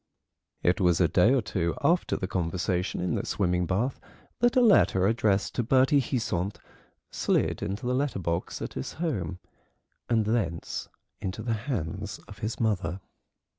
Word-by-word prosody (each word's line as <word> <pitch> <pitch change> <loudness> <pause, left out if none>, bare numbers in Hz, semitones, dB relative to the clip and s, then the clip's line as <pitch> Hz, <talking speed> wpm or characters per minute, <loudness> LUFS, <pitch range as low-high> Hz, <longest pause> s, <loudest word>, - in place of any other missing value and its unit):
It 90 +4 +2
was 90 -2 +3
a 90 - +5
day 90 +8 +4
or 135 -3 +3
two 85 -4 -1
after 175 +1 +2
the - - -2
conversation 90 +1 -1
in 90 - 0
the - - -1
swimming 90 -2 0
bath 115 +8 0 0.4
that 240 +2 +3
a 255 - +6
letter 195 - +5
addressed 105 -2 +1
to 120 - 0
Bertie 130 +4 +4
Heasant 100 -7 -2 0.5
slid - - 0
into 100 +6 -3
the 125 - +1
letter 140 -1 0
box 85 -1 -2
at - - -5
his - - -5
home, 105 - -2 0.7
and 115 -3 +2
thence 105 -7 -2 0.3
into 95 -1 -4
the 115 - 0
hands 110 - -3
of 100 0 -12
his 110 +2 -3
mother. 100 -4 0
100 Hz, 160 wpm, -28 LUFS, 90-125 Hz, 0.7 s, a